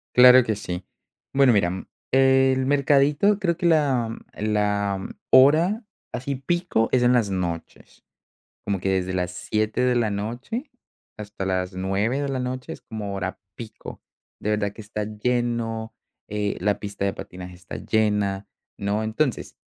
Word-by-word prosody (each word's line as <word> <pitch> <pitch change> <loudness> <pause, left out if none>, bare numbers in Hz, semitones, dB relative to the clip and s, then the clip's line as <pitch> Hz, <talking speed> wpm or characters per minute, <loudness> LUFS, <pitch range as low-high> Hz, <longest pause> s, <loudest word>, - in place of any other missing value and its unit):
Claro 125 0 +9
que 110 -2 -1
sí. 90 -3 -5 0.5
Bueno, 135 -3 +5
mira, 100 -4 +3
m 95 +1 -5 0.3
el 130 0 +4
mercadito, 145 +8 +3
creo 170 -4 0
que 175 - -3
la 135 -9 +2 0.2
la 105 -2 0 0.3
hora 160 - +5 0.3
así 135 +3 -3
pico 155 -4 0
es 130 - +3
en 125 0 +4
las 115 -5 +2
noches. 85 -3 -5 0.6
Como 100 -2 -1
que 95 - -2
desde 95 -1 0
las 90 -1 -1
7 110 +6 -1
de 125 -1 +3
la 115 -3 +1
noche 120 - -4 0.4
hasta 105 -2 -6
las 95 0 -1
9 100 +8 0
de 140 - -2
la 135 -1 -2
noche 125 0 -4
es - - -9
como 105 -3 -6
hora 95 -1 -4 0.2
pico. 115 -2 -10 0.4
De 105 - -1
verdad 105 -1 0
que 110 - -12
está 105 0 -4
lleno, 115 0 -2 0.3
eh, 105 -1 -2
la 100 +3 0
pista 100 -1 -4
de 100 - +1
patinaje 90 0 -9
está 95 +1 -9
llena, 105 -2 0 0.3
¿no?, 105 +2 -1
entonces, 120 +5 -1
110 Hz, 155 wpm, -24 LUFS, 100-130 Hz, 0.6 s, Claro